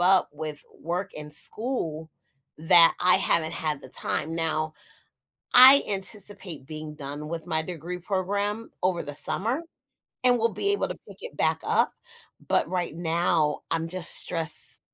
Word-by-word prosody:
up 185 +1 +4
with 150 0 -5 0.2
work 180 +4 -3
and 150 0 -8
school 165 - -1 0.5
that 165 +1 +6
I 180 0 +5
haven't 160 -1 +1
had 155 -4 -2
the - - -11
time. 155 +4 -3
Now 160 -1 -1 0.8
I 260 +3 +9
anticipate 195 - -3
being 155 0 -7
done 145 +1 -7
with 165 -1 -5
my 160 - 0
degree 175 +1 -6
program 200 +4 -2
over 180 -2 +1
the 145 -1 -7
summer 230 - 0 0.6
and 245 -1 +5
we'll 230 0 +2
be 400 - 0
able 405 - 0
to - - -5
pick - - -13
it - - -9
back - - +1
up. - - +2 0.6
But - - +2
right 180 -4 -2
now, 165 -2 +1
I'm 165 0 -1
just 180 0 -2
stressed 165 -3 0
170 Hz, 155 wpm, -26 LUFS, 155-195 Hz, 0.8 s, I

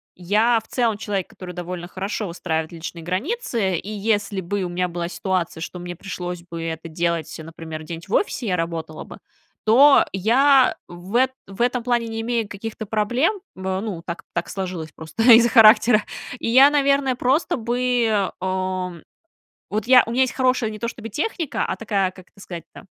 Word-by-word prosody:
я, 215 +6 +2
в - - -23
целом, 230 -4 0
человек, 200 -3 -3
который 180 -1 -9
довольно 175 0 -5
хорошо 200 +3 -4
выстраивает 160 -2 -3
личные 165 0 -7
границы, 210 - -1
и 200 - -7
если 205 -2 -1
бы 195 +2 -2
у 175 - -3
меня 180 +1 -1
была 170 0 -3
ситуация, 180 -3 -2
что 180 +2 -6
мне 175 0 -6
пришлось 180 -2 -6
бы 170 -1 -7
это 165 0 -5
делать, 165 -1 -1
например, 160 -1 -8
где-нибудь 165 +4 -8
в - - -5
офисе, 270 - 0
я 180 -2 +1
работала 165 -2 -4
бы, - - -12 0.5
то 275 +6 +7
я 255 +5 +4
в 175 +5 -9
эт 260 +1 +4 0.2
в 195 +3 -7
этом 245 0 +1
плане 240 -1 0
не 225 0 -4
имею 230 -2 -1
каких-то 220 +2 -6
проблем. 240 - 0 0.2
В 190 0 -3
ну, 200 -7 -5
так 170 +1 -5
так 170 0 -2
сложилось 180 -5 -5
просто 160 +8 -4
из-за 235 +1 +7
характера. 220 -1 +6 0.4
И - - -2
я, 265 +4 +8
наверное, 280 -2 +2
просто 260 +6 +1
бы, 235 -3 +1
ам, 185 -2 -3 0.7
вот, 215 +2 -2
я 255 -1 +8
у 230 - -5
меня 250 +3 +1
есть 260 - +2
хорошая 255 -3 +1
не 215 -1 -8
то 235 - -2
чтобы 225 -1 -7
техника, 320 - -2
а - - -2
такая, 200 -4 0
как 185 0 -16
это - - -22
сказать-то, 175 +1 -10
200 Hz, 185 wpm, -22 LUFS, 175-235 Hz, 0.7 s, я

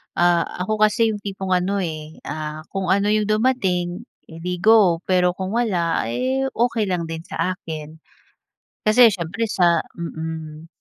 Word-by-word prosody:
ah, 175 -1 +3 0.2
ako 215 +3 -1
kasi 225 +1 +2
yung 205 - -4
tipong 195 -2 -5
ano 190 +2 +1
eh, 155 -1 -6
ah, 155 0 -5
kung 195 -2 -3
ano 200 +2 +2
yung 215 -1 +2
dumating 215 -4 0 0.2
edi 175 +2 -5
go. 200 -6 +5
Pero 180 -1 +3
kung 190 +1 -4
wala 175 - 0
eh, 260 - -1
okey 230 -2 +1
lang 175 -3 -2
din 165 +1 -6
sa 185 0 -2
akin. 155 -2 -8 0.9
Kasi 230 +3 +7
siyempre 195 +3 -2
sa 175 -4 +3 0.2
mm. 160 -1 -6
180 Hz, 150 wpm, -22 LUFS, 165-215 Hz, 0.9 s, Kasi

